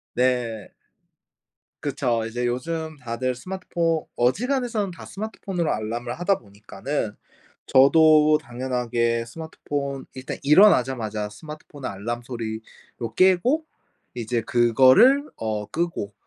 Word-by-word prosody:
네. 120 -4 0 1.1
그쵸. 125 -5 -1
이제 120 +2 -3
요즘 155 +6 -3
다들 125 +1 -2
스마트포 170 0 -2
어지간해서는 220 - 0
다 170 - -11
스마트폰으로 195 -3 -3
알람을 120 +3 -4
하다 185 +2 +1
보니까는 105 +3 -5 0.5
저도 155 +2 +6
당연하게 120 -3 -1
스마트폰 140 -1 -5
일단 130 0 -6
일어나자마자 125 - +4
스마트폰 145 +4 -11
알람 110 +5 -4
소리로 115 0 -7
깨고 190 - +3 0.5
이제 120 0 -2
그거를 130 - +5
어 105 -2 -3
끄고 165 - -3
130 Hz, 265 characters per minute, -24 LUFS, 115-165 Hz, 1.1 s, 저도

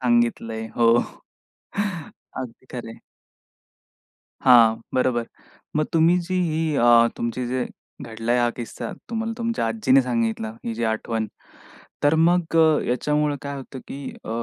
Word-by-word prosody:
सांगितलय 120 -2 +1
हो. 115 0 +5 1.4
अगदी 125 0 -7
खरंय. 115 -2 -7 1.4
हां, 115 -3 +7 0.2
बरोबर 125 -2 +1 0.5
मग 155 0 +2
तुम्ही 165 +2 +5
जी 180 +2 -5 0.2
ही 155 -1 0
अ, 120 -2 +6
तुमची 120 +2 -2
जे 125 0 -1 0.4
घडलाय 115 0 -1
हा 120 0 +3
किस्सा, 120 -2 -6 0.2
तुम्हाला 225 0 -2
तुमच्या 230 - -1
आजीने 130 +4 +3
सांगितला 115 -3 -1
ही 115 - -3
जी 115 +1 -3
आठवण. 110 0 -1 0.8
तर 145 +2 +4
मग 170 0 +2
अ, 160 -2 +5
याच्यामुळं 150 +4 +1
काय 140 0 -5
होतं 130 0 -8
की 140 - -7 0.2
अ, - - -6
125 Hz, 130 wpm, -23 LUFS, 115-150 Hz, 1.4 s, हां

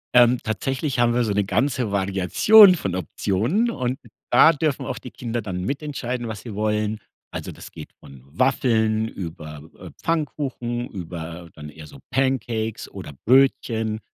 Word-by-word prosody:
Ähm, 125 0 +6
tatsächlich 130 - -2
haben 120 -1 +3
wir 125 - +2
so 105 - -1
ne 105 0 +2
ganze 125 0 0
Variation 100 - +6
von 95 - -3
Optionen 110 - 0
und 130 - -2 0.3
da 165 - +7
dürfen 150 -2 -1
auch - - -4
die 125 - -9
Kinder 120 -1 -4
dann 95 -4 -5
mitentscheiden, 135 -4 -3
was 110 -2 -6
sie 115 -2 -8
wollen. 105 +1 -1 0.3
Also, - - -6
das - - -12
geht - - -10
von 70 -2 -14
Waffeln 110 - +1
über, 75 -6 -8 0.2
äh, - - -9
Pfannkuchen 130 -7 -2
über 85 -2 -7
dann 75 -1 -9
eher 75 0 -12
so 70 - -13
Pancakes 120 -4 -1
oder - - -8
Brötchen. 115 -4 +2
115 Hz, 155 wpm, -23 LUFS, 95-130 Hz, 0.3 s, da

